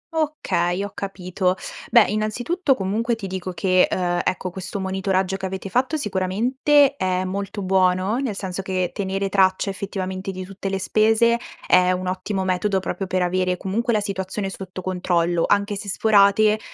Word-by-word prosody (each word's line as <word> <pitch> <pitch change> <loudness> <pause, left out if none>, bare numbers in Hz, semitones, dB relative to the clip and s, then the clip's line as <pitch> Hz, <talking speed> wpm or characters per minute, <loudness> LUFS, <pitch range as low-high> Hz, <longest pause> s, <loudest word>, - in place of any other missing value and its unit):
Okay, 200 - 0
ho 205 - -5
capito. 185 -1 -2 0.3
Beh 235 -4 +7
innanzitutto 245 - 0
comunque 220 +4 -1
ti 220 - -7
dico 185 -1 -4
che, 185 0 +3
uhm, 175 -1 0
ecco 185 0 -2
questo 190 +2 -6
monitoraggio 190 0 -1
che 190 - -4
avete 190 +1 -5
fatto 260 - +1
sicuramente 260 +7 +2
è 185 -3 0
molto 200 +2 -4
buono, 185 +3 +2
nel 255 -7 -2
senso 190 -1 -4
che 185 -2 -2
tenere 195 0 -2
traccia 190 0 +2
effettivamente 190 0 -4
di 185 -1 -5
tutte 195 +1 -6
le 195 - -1
spese 225 +4 +3 0.3
è 180 0 +5
un 185 0 -3
ottimo 190 +1 -2
metodo 190 +2 +1
proprio 190 +1 -4
per 185 0 0
avere 180 0 0
comunque 220 +7 -1
la 215 -2 +2
situazione 195 0 -3
sotto 185 -1 -8
controllo, 175 -2 +1
anche 205 0 +1
se 200 0 -6
sforate, 210 +1 +4
190 Hz, 160 wpm, -22 LUFS, 185-210 Hz, 0.3 s, Beh